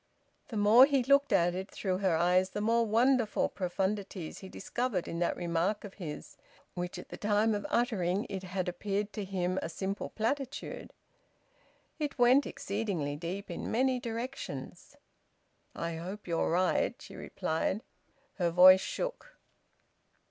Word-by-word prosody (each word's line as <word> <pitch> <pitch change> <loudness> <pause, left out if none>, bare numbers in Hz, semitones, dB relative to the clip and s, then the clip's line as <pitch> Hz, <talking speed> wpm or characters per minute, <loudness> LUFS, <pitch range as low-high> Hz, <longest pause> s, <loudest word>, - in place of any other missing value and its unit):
The 225 - -5
more 220 +6 +7
he 275 -3 +2
looked 280 +2 +4
at 175 +1 +3
it 190 +2 -5
through 185 -2 -2
her 190 -4 +2
eyes, 180 +3 +3
the 205 - -4
more 230 +2 +2
wonderful 235 +1 +2
profundities 190 -1 -3
he 190 - -10
discovered 235 -3 -2
in 170 - -4
that 175 - 0
remark 175 +4 -1
of 200 -2 -9
his, 160 -7 -8 0.4
which 175 0 -4
at - - -10
the - - -7
time 210 +1 +2
of 205 -1 -3
uttering 205 -5 +1
it 190 -1 -5
had 185 0 -3
appeared 200 +3 -2
to 210 - -4
him 185 -1 -1
a - - -4
simple 195 +4 -4
platitude. 270 +5 -3 1.1
It 295 -2 -3
went 255 +3 +5
exceedingly 195 -9 -3
deep 180 +6 -5
in - - -5
many 255 +2 +2
directions. 245 +3 -6 0.8
"I 170 -1 -3
hope 185 +5 -7
you 170 -1 0
are - - +1
right," 180 +2 +1
she - - -11
replied. 175 +7 -2 0.6
Her 175 -1 +2
voice 185 +2 +8
shook. - - -5
200 Hz, 150 wpm, -31 LUFS, 180-230 Hz, 1.1 s, voice